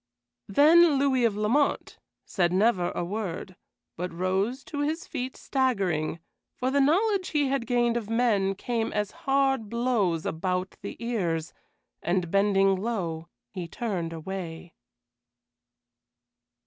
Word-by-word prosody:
Then 305 - +6
Louis 265 -3 +2
of 210 -3 +1
Lamont 240 +8 0 0.3
said 175 -3 +1
never 185 -2 +2
a 175 - -1
word, 190 -2 -4 0.4
but 180 +2 -4
rose 190 +9 -1
to 290 - -6
his 310 +3 -1
feet 260 -4 -5
staggering, 195 - 0 0.4
for 255 +1 -1
the 280 +1 +3
knowledge 375 +6 +2
he 290 -3 +1
had 265 -4 -1
gained 240 -1 +2
of 220 -3 -5
men 220 -5 +2
came 230 +2 -2
as 210 -1 -1
hard 270 -5 0
blows 225 -9 0
about 180 +3 -2
the - - -7
ears, 175 -9 -2 0.5
and 175 -1 -1
bending 195 -1 +3
low, 180 -7 -3 0.2
he 180 -4 -5
turned 180 -4 -3
away. 165 0 -6
210 Hz, 125 wpm, -27 LUFS, 180-260 Hz, 0.5 s, Then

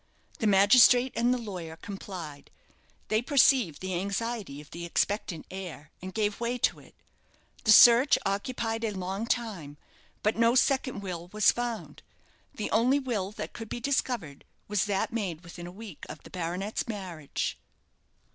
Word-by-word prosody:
The 220 - +1
magistrate 240 +6 +6
and 240 +1 +2
the 255 - +2
lawyer 180 -8 -6
complied. 175 -6 -8 0.6
They 215 +1 +2
perceived 255 - +3
the 185 0 -3
anxiety 200 -5 -3
of 150 - -14
the 170 - -7
expectant 175 -1 -1
heir, 175 -7 -8
and 185 +1 -6
gave 210 0 -1
way 240 +1 -1
to - - +1
it. - - -18 0.7
The 220 - +5
search 240 +5 +8
occupied 225 +3 -2
a 225 - +1
long 190 +4 -4
time, 195 -13 -3 0.5
but 215 - +2
no 230 +1 +4
second 260 -4 +2
will 175 -3 -6
was 210 +3 +4
found; 240 -2 -5 0.5
the 215 - -5
only 250 +5 +3
will 235 -9 -2
that - - -6
could 225 -2 -8
be - - -4
discovered 240 - -2 0.2
was 205 -1 +1
that 200 +1 -1
made 185 -8 -3
within 175 0 -9
a - - -8
week 200 -3 -10
of - - -9
the - - -14
baronet's 180 +4 -3
marriage. 185 -9 -4
205 Hz, 155 wpm, -28 LUFS, 180-235 Hz, 0.7 s, search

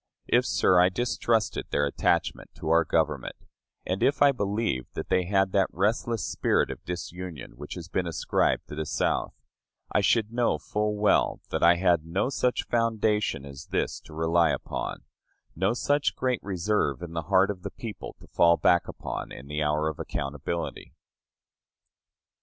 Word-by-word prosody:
If, - - +2
sir, 90 -1 +4
I 90 +1 +6
distrusted 115 +1 0
their 70 - +1
attachment 70 - 0
to - - -5
our 85 0 +5
Government, - - 0 0.5
and 95 +1 -2
if 140 0 +3
I 140 - +7
believed 105 - -2
that - - -5
they 90 -1 +2
had 95 0 +2
that 95 0 +3
restless 110 +3 0
spirit - - +1
of - - -9
disunion 90 -3 -6
which 75 +4 -8
has 85 -3 -7
been 90 0 -1
ascribed 85 - 0
to - - -8
the 80 0 -3
South, - - -1 0.6
I - - +4
should 115 -1 +2
know 120 0 +2
full 105 0 -2
well 105 0 +2
that - - -1
I 85 +1 +6
had 85 -2 +2
no 95 +9 -1
such 125 -2 0
foundation 110 - 0
as 70 +2 -10
this - - -1
to 75 - -14
rely 80 +1 +3
upon - - -3 0.5
no 95 +6 +1
such 145 +3 +1
great 125 -2 0
reserve 95 -5 -1
in 85 -1 -7
the 85 -1 -3
heart 95 +1 +4
of 95 -3 -8
the - - -5
people 110 -5 -8
to - - -14
fall 85 0 +4
back 85 -1 +3
upon - - -6
in 65 - -9
the 75 +2 -3
hour 75 +1 +1
of 80 - -4
accountability. 75 +5 -4
90 Hz, 170 wpm, -27 LUFS, 80-105 Hz, 0.6 s, I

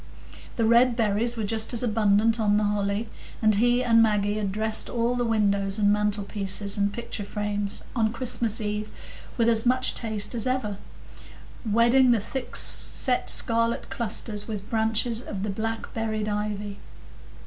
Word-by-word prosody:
The 230 - 0
red 235 +2 +4
berries 230 +1 +3
were 220 - -2
just 220 +3 -2
as 235 - 0
abundant 220 0 +2
on 205 -1 +2
the 210 - +1
holly, 205 +1 -1 0.3
and 215 -1 +3
he 240 +4 +2
and 230 -2 +4
Maggie 210 -1 +1
had 200 -2 -2
dressed 220 +2 -1
all 235 0 0
the 245 0 -1
windows 200 -3 0
and 205 -1 +3
mantlepieces 205 -1 -2
and 200 0 0
picture 235 -1 -6
frames 205 0 -3
on 220 -3 +1
Christmas 235 -2 -1
eve 210 0 -3 0.5
with 230 -2 +2
as 225 -1 +3
much 255 +1 +1
taste 215 -2 -3
as 235 0 -2
ever, 245 -6 -2 0.9
wedding 240 +4 +4
the 235 -2 +4
thick 245 +4 -6
set 250 -2 +2
scarlet 230 0 +2
clusters 215 -2 0
with 210 -2 -6
branches 225 +1 0
of 200 -5 -6
the 210 - -2
black 225 +2 -4
berried 220 -1 -3
ivy. 205 -1 -4
220 Hz, 160 wpm, -25 LUFS, 205-235 Hz, 0.9 s, red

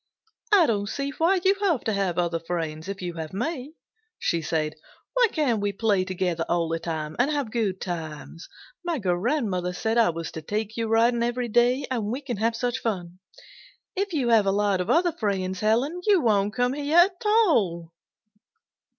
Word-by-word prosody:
"I 390 -5 +7
don't 205 -5 0
see 275 +3 -3
why 345 +6 +2
you 385 - +6
have 345 - +1
to 220 - -1
have 195 -4 -1
other 170 -1 0
friends 165 0 -4
if 195 -2 -5
you 175 -1 -3
have 160 0 -6
me," 280 - -4 0.4
she 170 - 0
said. 155 -1 -1 0.4
"Why - - +4
can't 255 -9 +1
we 205 0 -1
play 200 -2 +1
together 180 -3 -1
all 170 -1 +1
the 165 0 -1
time, 155 -2 -4
and 250 +4 +3
have 285 -7 -2
good 210 -6 -1
times? 165 -2 -6 0.3
My 345 -2 -1
grandmother 185 -2 -1
said 220 +5 0
I 230 - +5
was 165 0 -4
to 160 - -7
take 215 +5 -3
you 230 -1 -1
riding 230 +2 +3
every 240 +1 -1
day, 245 +4 +3
and 230 -5 -1
we 250 +6 -3
can 250 -6 -4
have 230 +2 0
such 245 +2 -1
fun. 180 -6 -4 0.8
If 395 +1 -1
you 275 -7 0
have 220 -4 +4
a - - +4
lot 200 -2 +1
of 180 - -4
other 340 +6 +3
friends, 190 - -2
Helen, 250 +11 +1
you 405 -3 +5
won't 210 -5 +1
come 250 0 +1
here 290 +3 0
at 365 +1 +4
all." 225 - +2
220 Hz, 190 wpm, -25 LUFS, 180-265 Hz, 0.8 s, I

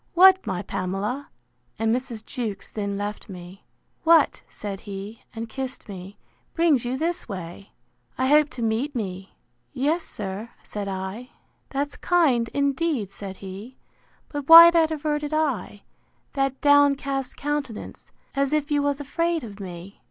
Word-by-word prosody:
What, 375 -1 +7
my 185 -3 -2
Pamela! 205 +9 -3 0.5
(and 225 +1 +2
Mrs. 245 -4 -5
Jewkes 220 -7 -5
then 200 -2 -3
left 205 +1 -5
me,) 180 +1 -10 0.4
What 330 -2 +4
(said 200 -2 -6
he, 200 +3 -7
and 225 0 -4
kissed 260 +2 -6
me) 195 0 -9 0.4
brings 325 -7 +3
you 245 +2 -2
this 335 0 -1
way? 185 0 -8 0.4
I 260 - +1
hope 300 +2 +5
to 240 - -3
meet 230 +6 -1
me.—Yes, 240 - -4
sir, 205 +2 -5
said 205 -1 -5
I. 190 +6 -5 0.4
That's 280 +1 -3
kind, 275 -10 +2
indeed, 280 - 0
said 195 -1 -8
he; 200 +7 -9 0.5
but 290 -1 -6
why 335 +1 +12
that 330 -2 +4
averted 300 -1 -2
eye?—that 270 0 -3
downcast 280 -2 +3
countenance, 290 -6 -4 0.2
as 275 +1 0
if 305 0 0
you 290 -1 +3
was 285 0 0
afraid 335 +3 -1
of 210 -3 -9
me? 185 0 -9
255 Hz, 135 wpm, -25 LUFS, 200-290 Hz, 0.5 s, why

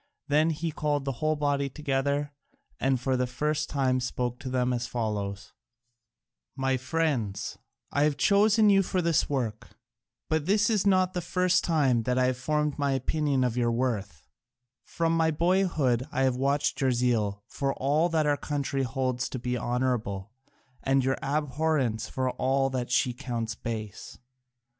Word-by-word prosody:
Then 155 +3 +4
he 165 +1 -2
called 145 -2 -1
the 135 - 0
whole 155 0 +2
body 140 -1 0
together, 140 0 -1 0.5
and 135 -1 +1
for 130 +1 0
the 125 0 0
first 150 +4 -1
time 130 -3 +1
spoke 125 -1 -3
to 130 - -6
them 125 -1 +1
as 120 0 -2
follows: 105 -3 -3 1.0
"My 135 -1 +1
friends, 130 -7 -2 0.3
I 145 +1 +2
have 150 -2 0
chosen 210 +1 +4
you 195 0 +5
for 185 0 -1
this 170 -2 +1
work, 125 -4 -3 0.5
but 160 0 0
this 205 +2 +3
is 205 -2 +2
not 185 -1 +3
the 180 - -2
first 180 +1 +1
time 140 -8 +2
that 125 +2 -1
I 130 - +3
have 130 -1 0
formed 150 +2 -1
my 140 -1 +1
opinion 140 0 0
of 125 -2 0
your 120 -1 +1
worth: 105 -10 -2 0.6
from 165 0 -1
my 165 -1 +3
boyhood 160 -7 +1
I 135 - 0
have 130 -1 +2
watched 140 +3 0
your 135 -1 +3
zeal 110 -5 0
for 135 +4 -2
all 150 +6 +1
that 160 -2 +1
our 145 -1 +2
country 140 -2 -2
holds 130 0 -1
to - - -4
be 125 0 -2
honourable 120 -5 -2 0.5
and 135 0 +2
your 135 0 0
abhorrence 145 -5 0
for 130 -1 -1
all 135 +2 +1
that 125 -2 -3
she 125 0 +2
counts 120 -3 -4
base. 110 -3 -6
135 Hz, 165 wpm, -28 LUFS, 125-155 Hz, 1.0 s, you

